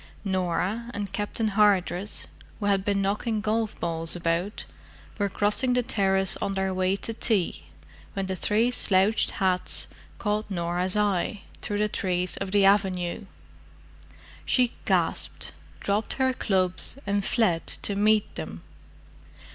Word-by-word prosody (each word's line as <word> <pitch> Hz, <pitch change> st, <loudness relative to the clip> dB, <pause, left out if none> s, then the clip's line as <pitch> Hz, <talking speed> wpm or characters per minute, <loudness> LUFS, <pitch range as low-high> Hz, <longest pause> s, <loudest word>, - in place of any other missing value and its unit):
Norah 190 Hz, +4 st, -1 dB
and 205 Hz, -1 st, -4 dB
Captain 215 Hz, +1 st, -1 dB
Hardress, 200 Hz, -2 st, +2 dB, 0.3 s
who 205 Hz, -, -3 dB
had 200 Hz, -1 st, +2 dB
been 200 Hz, -1 st, +1 dB
knocking 210 Hz, +3 st, 0 dB
golf 215 Hz, +1 st, -1 dB
balls 165 Hz, -1 st, -2 dB
about, 175 Hz, +4 st, -1 dB, 0.5 s
were 200 Hz, -1 st, +1 dB
crossing 210 Hz, +6 st, +2 dB
the 250 Hz, 0 st, +2 dB
terrace 195 Hz, -5 st, +1 dB
on 195 Hz, -, -2 dB
their 190 Hz, 0 st, 0 dB
way 185 Hz, +1 st, +1 dB
to 225 Hz, +3 st, -4 dB
tea 215 Hz, -5 st, 0 dB, 0.5 s
when 195 Hz, -1 st, -2 dB
the 190 Hz, 0 st, -2 dB
three 220 Hz, +6 st, +2 dB
slouched 200 Hz, -2 st, +3 dB
hats 185 Hz, -2 st, +1 dB, 0.3 s
caught 210 Hz, 0 st, -1 dB
Norah's 180 Hz, +1 st, 0 dB
eye 205 Hz, 0 st, 0 dB, 0.2 s
through 205 Hz, -, -2 dB
the 210 Hz, +1 st, +2 dB
trees 180 Hz, -3 st, -1 dB
of 195 Hz, -1 st, -4 dB
the 200 Hz, -1 st, +4 dB
avenue. 190 Hz, -2 st, +2 dB, 1.2 s
She 250 Hz, -2 st, +2 dB
gasped, -, -, 0 dB, 0.3 s
dropped 205 Hz, +2 st, -1 dB
her 260 Hz, -1 st, +1 dB
clubs, 190 Hz, -1 st, -1 dB
and 200 Hz, 0 st, 0 dB
fled 190 Hz, -7 st, +1 dB, 0.2 s
to 200 Hz, -, 0 dB
meet 215 Hz, +1 st, +3 dB
them. -, -, -7 dB
200 Hz, 135 wpm, -26 LUFS, 185-210 Hz, 1.2 s, the